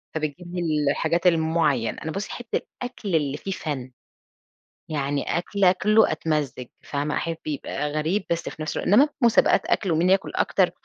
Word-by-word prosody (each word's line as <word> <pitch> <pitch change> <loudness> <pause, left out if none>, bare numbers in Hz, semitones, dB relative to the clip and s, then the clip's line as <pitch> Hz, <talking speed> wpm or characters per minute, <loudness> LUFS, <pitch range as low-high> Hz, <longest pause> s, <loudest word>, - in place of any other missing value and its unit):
فبتجيب 160 +3 -3
لي 155 -5 +1
الحاجات 165 +3 +1
المعيّنة، 160 -7 +2
أنا 160 - -3
بُصي 195 +4 -4
أحب 240 - -7
الأكل 225 -7 -3
اللي 145 -2 0
فيه 195 - -5
فَنّ، 135 -8 -4 1.0
يعني 145 0 -1
أكْل 200 +3 -1
آكله 210 +4 +4
أتمزّج، 150 -5 -2 0.2
فاهمة؟ 145 +1 -2
أحب 165 -1 -2
يبقى 145 0 -3
غريب 160 +6 0
بس 170 0 -1
في 155 - -7
نفس 155 - -4
الوقت - - -2
إنّما 260 +10 +6
مسابقات 235 -1 +4
أكْل 190 -5 +1
و - - +2
مين 175 +3 +3
ياكل 190 0 +2
أكتر، - - +2
160 Hz, 165 wpm, -24 LUFS, 150-185 Hz, 1.0 s, إنّما